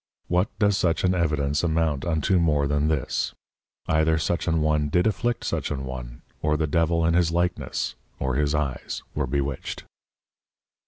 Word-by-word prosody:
What 90 +4 +2
does 100 -2 +3
such 85 -2 +1
an 90 0 +3
Evidence 75 -4 +1
amount 80 -4 +1
unto 85 +2 +2
more 75 -4 +2
than 75 +1 +1
this: 75 -4 -1 0.5
Either 80 0 +3
such 80 +3 -1
an 80 -1 +2
one 75 -1 +1
did 90 +4 +2
afflict 115 +3 0
such - - -2
an 65 -3 -3
one, 60 -2 -7 0.2
or 75 0 +2
the 80 - +1
Devil 85 +2 +2
in 85 - +3
his 85 -1 +3
likeness, 85 +1 -1 0.3
or 65 -1 -1
his 75 +2 +1
Eyes 70 -4 -3
were - - -1
bewitched. 70 0 -3
80 Hz, 165 wpm, -25 LUFS, 70-85 Hz, 0.5 s, does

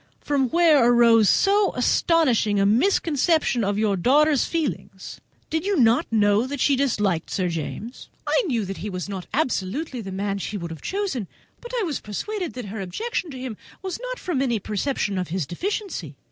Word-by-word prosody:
from 275 -3 0
whence 330 -2 +5
arose 235 -3 +5
so 400 0 +3
astonishing 250 - +2
a 195 - +3
misconception 290 - +2
of 200 0 0
your 210 -2 +1
daughter's 285 - +3
feelings? 330 -3 -4 0.3
Did 320 0 0
you 400 -1 0
not 230 -1 +4
know 210 +1 +3
that 285 0 -5
she 280 +2 +3
disliked 210 - 0
Sir 185 -2 -1
James?" 170 - -6 0.2
"I - - +2
knew 235 -8 0
that 195 0 -6
he 210 - -5
was 185 -1 -5
not 190 -3 -6
absolutely 260 - -2
the 195 -3 -7
man 200 +1 -2
she 205 +2 -4
would 170 -3 -6
have 160 - -8
chosen, 375 - -3 0.3
but 480 - -9
I - - 0
was 315 -7 -2
persuaded 360 - -4
that 250 -2 -6
her 205 +1 -6
objections 350 - -3
to 260 - -7
him 255 -2 -5 0.3
did 375 0 -4
not - - -5
arise - - -14
from 335 -8 0
any 240 -4 +1
perception 210 -1 -2
of 180 - -3
his 175 -1 -2
deficiency. 310 - -4
240 Hz, 190 wpm, -23 LUFS, 200-320 Hz, 0.3 s, whence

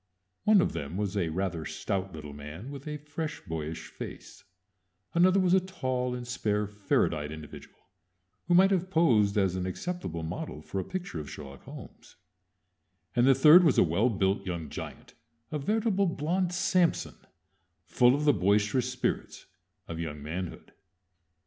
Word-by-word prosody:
One 210 -3 +6
of - - 0
them 75 +5 -5
was 105 -1 -2
a 90 -5 0
rather 85 -1 -2
stout 95 +4 -3
little 75 -3 -8
man, 75 - -8
with 140 +1 -9
a 150 0 -3
fresh, 150 +2 -5
boyish 80 -2 -5
face; - - -9 0.7
another 185 +3 +5
was 185 -1 +3
a 190 - +6
tall 130 -9 -2
and 120 -1 -6
spare 105 -3 0
ferret 105 -1 +1
eyed 75 0 -4
individual 80 -2 -10 0.7
who 175 - +4
might 190 +2 +6
have 185 -1 +1
posed 115 - +3
as 95 -3 +2
an 95 0 -2
acceptable 95 - -4
model 80 -2 -5
for 95 - -4
a - - -1
picture 180 - -5
of 75 - -7
Sherlock 70 -2 -10
Holmes; - - -12 1.0
and 120 +1 +4
the 135 - +7
third 155 +7 +8
was 155 -6 +4
a - - +7
well 95 +8 +2
built 95 -2 0
young 85 -5 -4
giant, - - -8 0.4
a 150 - -2
veritable 205 +4 +1
blond 170 +3 0
Samson, 180 -1 +1 0.7
full 125 +1 +4
of 150 +1 -1
the 145 - +6
boisterous 105 +6 +2
spirits 125 0 -3 0.4
of 85 -1 -6
young 75 -3 -5
manhood. 85 +4 -6
110 Hz, 160 wpm, -29 LUFS, -, 1.0 s, third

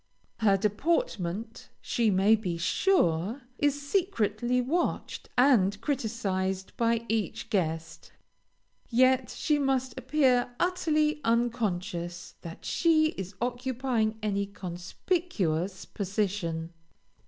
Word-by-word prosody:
Her 200 -3 +4
deportment, 215 - -1
she 230 -2 +1
may 200 +3 +5
be 185 -6 -3
sure, 200 - +1 0.2
is 290 -1 +2
secretly 250 - +1
watched 300 +8 -2
and 215 -7 +4
criticised 200 -7 -2
by 230 0 +1
each 220 -2 -2
guest, 165 -4 -2 0.8
yet 255 0 +4
she 300 -1 0
must 260 -3 0
appear 255 -2 +2
utterly 310 -4 +1
unconscious 200 -8 -1
that 165 -1 -9
she 315 -2 +3
is 190 - -7
occupying 245 -2 -1
any 200 -1 0
conspicuous 190 - -2
position. 185 -5 -2
225 Hz, 95 wpm, -28 LUFS, 190-260 Hz, 0.8 s, may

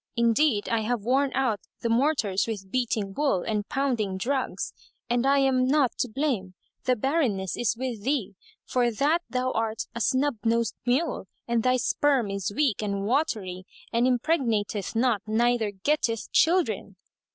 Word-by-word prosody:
Indeed, 235 -1 +2
I 230 - +1
have 220 0 -1
worn 265 +4 +2
out 250 -6 +1 0.2
the - - -1
mortars 230 -6 +1
with 195 -4 -5
beating 225 -6 -1
wool 275 -8 +1
and 210 -2 -2
pounding 245 -9 -1
drugs,[FN#186] 260 +6 -3 0.3
and 245 +2 +2
I 280 +1 +4
am 265 -2 +3
not 275 -2 +3
to 250 - 0
blame; 215 -8 -2 0.3
the 255 - +3
barrenness 240 - 0
is 235 -1 0
with 245 -4 -4
thee, 250 -5 -1 0.3
for 245 -1 +1
that 295 +9 +1
thou 255 0 -1
art 225 -1 -2
a 235 - -4
snub 265 +2 +1
nosed 230 0 +1
mule 260 - 0 0.2
and 235 -1 +1
thy 255 +2 +3
sperm 255 -3 +1
is 195 -2 -2
weak 245 -2 +1
and 200 -1 -2
watery 205 - -1 0.3
and 235 +2 +3
impregnateth 235 - 0
not 230 -2 +2
neither 230 0 +2
getteth 230 +2 -1
children." 355 +2 +2
235 Hz, 155 wpm, -26 LUFS, 210-270 Hz, 0.3 s, I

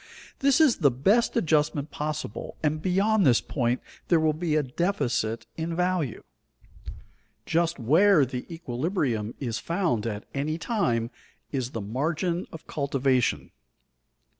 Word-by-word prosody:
This 275 +1 +4
is 305 -7 +5
the 145 -5 +4
best 195 - +2
adjustment 150 -5 +1
possible, 150 -6 -4
and 155 0 0
beyond 195 +4 +2
this 125 -7 +5
point 125 -2 -1 0.3
there 170 - +4
will 155 -1 +2
be 155 0 -1
a 155 - +3
deficit 125 - -1
in 165 +1 -3
value. 180 -7 -1 1.2
Just 170 +1 +1
where 155 - +5
the 125 +4 -6
equilibrium 125 - -2
is 120 -5 -3
found 165 - -1
at 105 -2 -4
any 150 +3 -1
time 125 - 0 0.4
is 130 -3 -2
the 115 - -5
margin 160 - -1
of 160 - -10
cultivation. 135 -3 0
155 Hz, 130 wpm, -26 LUFS, 125-175 Hz, 1.2 s, is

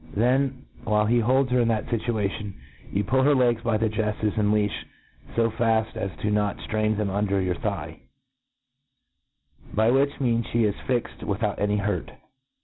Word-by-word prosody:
Then> 130 +4 +1 0.2
while 105 0 +2
he 120 +2 +3
holds 130 +3 +2
her 125 - +3
in 115 - +2
that 110 -2 0
fituation, 105 -3 -2 0.4
you 100 - 0
puU 130 +6 +2
her 145 +1 +4
legs 120 -3 +2
by 115 -2 +1
the 110 +1 +1
jeflfes 110 -1 -1
and 105 -1 +2
leafh 105 -1 +2 0.6
fo 115 -1 +2
faft 110 -1 +1
as 100 - -2
not 105 -1 +1
to - - -11
ftrsdn 110 -1 0
them 105 -2 -1
under 100 0 0
your 90 -1 0
thigh; 85 -4 -4 1.7
by 110 +2 +3
which 140 +2 +2
means 115 -3 +1
ihe 115 -2 +4
is 105 -1 0
jBzed 125 -2 -2
with 100 +2 -3
out 105 -2 -1
any 105 0 +1
hurt. 105 +1 -2
110 Hz, 175 wpm, -25 LUFS, 105-120 Hz, 1.7 s, her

